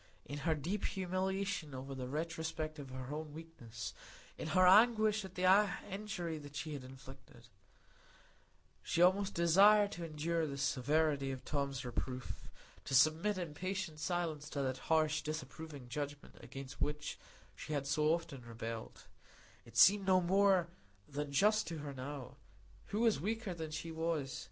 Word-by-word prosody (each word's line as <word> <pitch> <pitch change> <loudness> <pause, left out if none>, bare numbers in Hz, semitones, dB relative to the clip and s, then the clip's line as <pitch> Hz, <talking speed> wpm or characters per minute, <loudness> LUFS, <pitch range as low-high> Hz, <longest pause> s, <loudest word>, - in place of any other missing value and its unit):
In 145 +1 -5
her 160 - +3
deep 175 +8 -2
humiliation 190 -4 -2
under 135 +1 -6
the 130 -1 -5
retrospect 160 +1 -3
of 140 -2 -8
her 130 +2 -6
own 155 -1 -5
weakness,—in 125 -6 -9
her 185 +4 +4
anguish 215 +1 +6
at 190 -1 -10
the 180 - -2 0.5
injury 190 -6 -4
she 155 +2 -4
had 140 -3 -6
inflicted,—she 130 -2 -13 1.5
almost 190 +3 +4
desired 200 +5 +6
to 170 - -6
endure 165 +1 -1
the 140 -1 -5
severity 140 +1 +1
of 130 -1 -7
Tom's 140 -3 -2
reproof, 125 +1 -5 0.4
to 135 - 0
submit 160 +9 +4
in 170 -5 -4
patient 185 -1 -3
silence 155 -2 -2
to 140 -2 -2
that 130 -1 -2
harsh, 155 -1 +3
disapproving 155 -2 -6
judgment 145 +3 -5
against 135 -1 -9
which 150 0 -2 0.4
she 155 - -6
had 140 -2 -1
so 150 +2 +2
often 165 -6 -2
rebelled; 115 -1 -7 0.6
it - - -10
seemed 195 0 +7
no 185 -1 +6
more 190 -1 +3 0.4
than 145 0 -4
just 210 +9 +3
to 165 - -4
her 145 -2 -6
now,—who 130 - -8
was 225 -10 +3
weaker 220 +1 -2
than 160 -2 -5
she 165 +2 -5
was? 160 -4 -2
155 Hz, 145 wpm, -35 LUFS, 140-180 Hz, 1.5 s, seemed